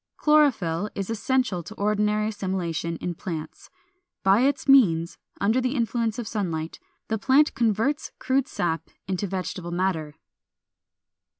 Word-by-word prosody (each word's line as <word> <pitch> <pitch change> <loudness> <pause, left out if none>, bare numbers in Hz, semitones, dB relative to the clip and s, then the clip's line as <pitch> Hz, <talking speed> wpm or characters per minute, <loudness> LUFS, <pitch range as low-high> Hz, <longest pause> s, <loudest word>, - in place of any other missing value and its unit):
Chlorophyll 220 - +3
is 195 +2 -3
essential 225 -4 0
to 210 +6 -10
ordinary 210 +1 +1
assimilation 175 -5 -3
in 175 - -3
plants: 160 -2 -7 0.5
by 195 +4 +5
its 280 +2 +1
means, 175 -12 +4 0.2
under 220 +6 +2
the 255 +2 -1
influence 230 -2 0
of 240 -3 -4
sunlight, 165 -7 -3 0.3
the 220 -1 -1
plant 275 +6 +4
converts 235 +6 0
crude 265 0 0
sap 165 -2 -2 0.2
into 190 +1 -2
vegetable 185 -1 -4
matter. 170 -4 -1
205 Hz, 125 wpm, -25 LUFS, 175-240 Hz, 0.5 s, by